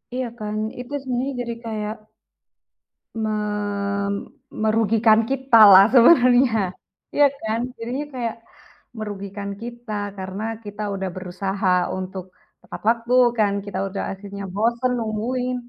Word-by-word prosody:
Iya 255 -1 -2
kan, 210 0 -4 0.2
itu 250 +3 -8
sebenarnya 260 +1 -2
jadi 235 -1 -4
kayak 215 -1 -3 1.2
me 220 -1 -1 1.2
merugikan 220 0 +3
kita 265 -3 +3
lah, 195 +1 +9
sebenarnya. 250 -2 +6 0.6
Iya 290 - +5 0.2
kan? 220 +1 -1 0.2
Jadinya 250 +6 -4
kayak, 235 -3 -3 0.6
merugikan 200 -1 -5
kita, 240 -1 -8 0.3
karena 190 +2 -5 0.2
kita 205 +1 -7
udah 190 -1 -3
berusaha 190 +2 -3 0.3
untuk 185 0 -5 0.4
tepat - - -9
waktu 235 +1 0 0.2
kan, 205 -2 +2
kita 195 -2 -5
udah 195 - -4
akhirnya 200 0 -8
bosen, 235 +4 +1
nungguin. 245 +3 -2
220 Hz, 115 wpm, -22 LUFS, 200-245 Hz, 1.2 s, lah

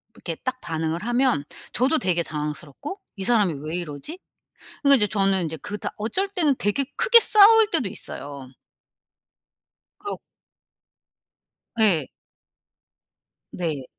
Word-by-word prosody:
이렇게 165 -2 -6
딱 255 0 -3
반응을 160 +2 -3
하면 240 - +1 0.3
저도 270 +6 +3
되게 175 -2 0
당황스럽고 150 - -6 0.2
'이 195 - -5
사람이 210 -6 +3
왜 160 +3 -3
이러지?' 175 - -7 0.7
그러니까 280 0 +8
이제 210 -5 +3
저는 195 -2 +1
인제 160 0 -5
그 205 +7 -6
다 - - -4
어쩔 235 - -2
때는 325 -9 +1
되게 205 +7 0
크게 475 0 +6
싸울 440 0 +6
때도 245 - 0
있어요. 140 -9 -8 1.5
그렇 410 - -6 1.6
예. 175 -10 +3 1.4
네. 155 -7 -4
205 Hz, 245 characters per minute, -23 LUFS, -, 1.6 s, 그러니까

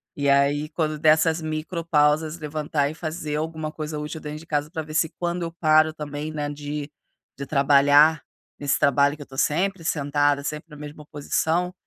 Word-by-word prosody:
E 140 -1 0
aí 140 +2 +2
quando 155 -2 -2
dessas 160 +1 +3
micropausas 155 -1 0
levantar 150 -1 -1
e - - -6
fazer 155 -2 -4
alguma 155 0 -3
coisa 155 -1 -5
útil 150 +2 -5
dentro 150 0 -6
de 165 - -13
casa 150 -1 -1
pra 165 -2 -3
vê 155 0 -10
se 160 +1 +2
quando 175 0 -2
eu 165 - -4
paro 155 -1 +3
também, 150 0 -5
né, 150 -1 -3
de 145 0 -5 0.5
de 140 - -5
trabalhar 145 +2 +5 0.4
nesse 145 -1 +1
trabalho 140 +1 +3
que - - -12
eu - - -8
tô 135 - -12
sempre 180 +5 0
sentada, 145 -1 +1
sempre 150 +3 -5
na - - -10
mesma 150 0 -10
posição, 160 +5 -1
150 Hz, 180 wpm, -24 LUFS, 145-160 Hz, 0.5 s, trabalhar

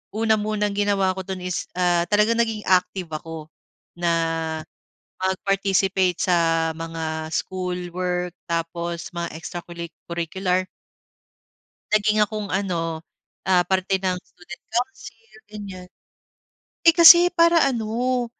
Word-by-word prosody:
una 220 0 +3
munang 210 -1 -1
ginawa 200 -2 +2
ko 190 - -7
dun 185 -1 -6
is, 180 -1 -3
ah, 175 -1 +2
talagang 210 +3 +3
naging 225 -2 -2
active 185 -1 +1
ako 155 0 -7 0.5
na 170 -1 +1 1.1
mag-participate 190 -1 +1
sa, 165 -2 +2
mga 160 -1 -4
schoolwork 180 0 -3 0.2
tapos 170 0 -3
mga 170 0 -3
extra 175 +2 -6
culi 170 -1 -7 0.2
curricular. 180 +2 -1 1.3
Naging 215 0 +3
akong 210 0 -4
ano, 165 -4 -2 0.4
ah, 185 -2 +4
parte 190 0 0
ng 185 -1 0
student 175 0 -13
council 230 -2 -5 0.2
ganyan. 195 -4 -8 0.9
Eh, 330 -1 +6
kasi 345 +1 +9
para 335 -1 +4
ano, 245 +1 -1
185 Hz, 110 wpm, -23 LUFS, 170-210 Hz, 1.3 s, kasi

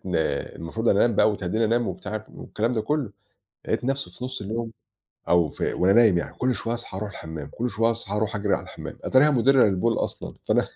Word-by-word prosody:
إن 90 - -3 0.4
المفروض 110 +8 -3
أنام 105 +3 +4
بقى - - +5
وتهدِّيني 105 +2 -1
أنام 115 +1 +1
وبتاع 110 +2 -5
والكلام 115 +3 -2
ده 115 - 0
كلّه، 130 -2 -1 0.5
لقيت 110 - -1
نفسي 135 +2 -1
في 125 - -6
نُصّ 130 -3 -5
اليوم، 115 +3 -3 0.6
أو 85 -3 +4
ف - - -16
وأنا 95 +2 +3
نايِم 110 -5 +6
يعني، - - -5
كل 125 0 +1
شوية 115 0 -2
أصحى 120 -5 -6
أرُوح 105 0 -4
الحمَّام، 80 -6 -7
كل 120 +1 -3
شوية 115 +1 +2
أصحى 110 -3 -3
أرُوح 110 +1 -1
أجري 100 -1 +1
على - - -3
الحمَّام، - - -9
أتاريها 135 +4 +5
مُدِرَّة 135 0 +5
للبول 105 +3 +2
أصلًا، - - -4
فأنا - - +2
110 Hz, 205 wpm, -25 LUFS, 100-120 Hz, 0.6 s, نايِم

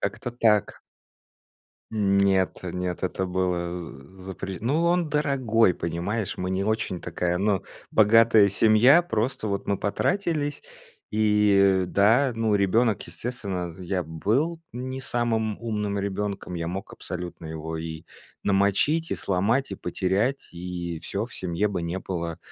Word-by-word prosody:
Как-то 120 - -3
так. 110 -4 +2 1.2
Нет, 100 -2 +2
нет, 90 0 -4
это 95 0 -1
было 90 -1 -1
з 80 -1 -10
запре 95 0 -5
Ну, 145 +8 +1
он 170 -2 +2
дорогой, 130 - +2
понимаешь, 90 +7 -3
мы 90 - -2
не 95 +1 0
очень 110 -4 -1
такая, 90 0 -1
ну 100 0 +1 0.3
богатая 110 -1 +6
семья, 115 - +5
просто 115 -6 -2
вот 100 -1 -2
мы 100 - +1
потратились. 150 - -1 0.5
И, 105 -3 +4
да, 115 +8 +4
ну 110 -2 +1
ребенок, 105 +2 +2
естественно, 100 -8 -5
я 90 0 -2
был 110 - 0
не 130 +2 -5
самым 115 -4 -1
умным 105 -3 -2
ребенком, 100 -1 -3
я 85 -1 -3
мог 95 +5 -5
абсолютно 90 -2 -7
его 80 0 -5
и 80 -1 -6 0.4
намочить, 100 +12 +2
и - - +1
сломать, 105 +9 0
и - - -3
потерять, 95 +9 -1
и 85 -1 -5
всё, 100 +6 -3
в 125 - -12
семье 90 +3 -1
бы 95 -4 -3
не 85 +2 -3
было 85 -3 -4
100 Hz, 135 wpm, -25 LUFS, 90-115 Hz, 1.2 s, богатая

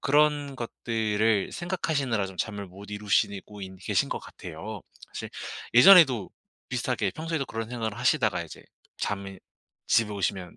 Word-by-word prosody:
그런 145 -1 +2
것들을 110 -3 0
생각하시느라 155 - -1
좀 95 -1 -10
잠을 100 -2 -3
못 100 +3 -12
이루시고인 100 -1 -1
계신 90 - 0
것 - - -2
같아요. 95 +5 -8 0.3
사실 - - -5 0.5
예전에도 130 - +8 0.4
비슷하게 - - 0
평소에도 160 -2 -2
그런 115 -1 -4
생각을 115 -2 -3
하시다가 120 - +2
이제 85 - -11 0.4
잠이 100 -1 -3 0.5
집에 115 -2 +3
오시면 95 -2 -3
110 Hz, 330 characters per minute, -27 LUFS, 100-135 Hz, 0.5 s, 예전에도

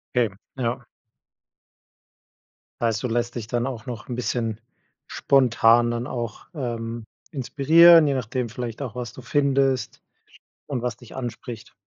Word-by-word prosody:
Okay, 115 -5 +2 0.2
ja. 120 -2 -1 2.0
Heißt, 115 -2 0
du 125 - -1
lässt 120 +1 -1
dich 115 -3 -5
dann 120 +2 -1
auch 120 -4 -6
noch 120 -3 -7
'n 125 - -4
bisschen 115 -2 -2 0.5
spontan 120 -3 +4
dann 120 +1 -3
auch, 120 -5 -5
ähm, 115 -4 -4 0.3
inspirieren, 160 +4 +6
je 140 - +2
nachdem 125 -1 -2
vielleicht 120 +1 -6
auch, 125 -4 -5
was 125 -2 -5
du - - -10
findest 135 -1 +1 0.6
und 130 -4 -3
was 120 0 -3
dich 120 - -14
anspricht? 120 -2 -7
120 Hz, 135 wpm, -24 LUFS, 115-130 Hz, 2.0 s, inspirieren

